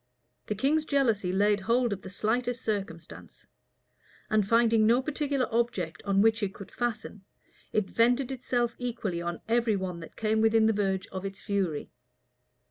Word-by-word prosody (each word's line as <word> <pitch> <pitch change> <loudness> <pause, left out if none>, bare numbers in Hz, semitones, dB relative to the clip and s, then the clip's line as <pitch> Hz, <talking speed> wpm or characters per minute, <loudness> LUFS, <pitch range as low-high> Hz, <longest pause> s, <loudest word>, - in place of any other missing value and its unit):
The 210 - -1
king's 285 +8 +2
jealousy 230 -11 +1
laid 205 +2 +3
hold 235 +3 +1
of 195 - -7
the 190 - -9
slightest 240 +4 -1
circumstance; 195 -6 -5 0.9
and 215 -2 +2
finding 230 -1 +4
no 235 +2 +5
particular 280 -1 -1
object 190 -9 -1
on 200 0 +3
which 225 +1 +3
it 195 -2 -2
could 200 - -10
fasten, 230 -4 -4 0.5
it 215 -3 +1
vented 245 +3 +2
itself 240 -2 -1
equally 225 -8 -3
on 170 0 -4
every 230 -1 +2
one 185 -3 -4
that 165 - -11
came 220 0 +1
within 225 0 +4
the 225 - +4
verge 195 -2 0
of 190 0 -5
its 195 0 -5
fury. 190 -7 -2
220 Hz, 160 wpm, -28 LUFS, 195-240 Hz, 0.9 s, no